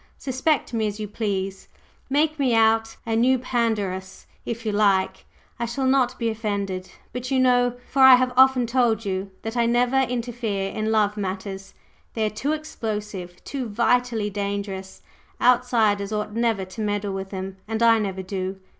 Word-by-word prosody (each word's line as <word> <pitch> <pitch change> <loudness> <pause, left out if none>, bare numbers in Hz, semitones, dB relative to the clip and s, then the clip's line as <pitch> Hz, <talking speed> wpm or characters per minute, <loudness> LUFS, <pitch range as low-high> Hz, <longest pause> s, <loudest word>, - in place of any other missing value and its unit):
Suspect 270 +2 0
me 220 -2 +1
as 210 +1 -5
you 210 - -3
please, 195 -2 -3 0.4
make 305 +2 +1
me 255 -4 +2
out 225 0 +3
a 225 -1 -1
new 255 +3 +4
Pandarus, 215 -7 -2 0.2
if 230 0 -4
you 215 - 0
like 200 -2 +1 0.3
I 235 - -1
shall 260 +3 -2
not 260 -1 +2
be 230 -1 0
offended. 200 -4 -3 0.2
But 250 0 -4
you 265 -1 +2
know 245 -1 +3
for 270 - 0
I 265 -1 +10
have 255 0 +1
often 260 -1 +5
told 230 -2 +1
you 190 0 -2
that 225 +2 -4
I 235 -1 +2
never 245 +2 +2
interfere 235 -6 -2
in 215 0 -2
love 210 -1 +2
matters. 195 0 -5 0.4
They 220 -1 +1
are 215 - -1
too 275 +7 -2
explosive, 210 - -5
too 260 -5 -4
vitally 235 -1 +1
dangerous; 200 -1 -4 0.4
outsiders 230 -5 +3
ought 210 0 -3
never 225 -4 0
to 190 +4 -8
meddle 205 -1 -1
with 195 0 -5
them. 190 0 -6
And 225 +1 -1
I 230 -1 +6
never 190 -3 -3
do. 190 0 -4
220 Hz, 170 wpm, -24 LUFS, 200-245 Hz, 0.4 s, I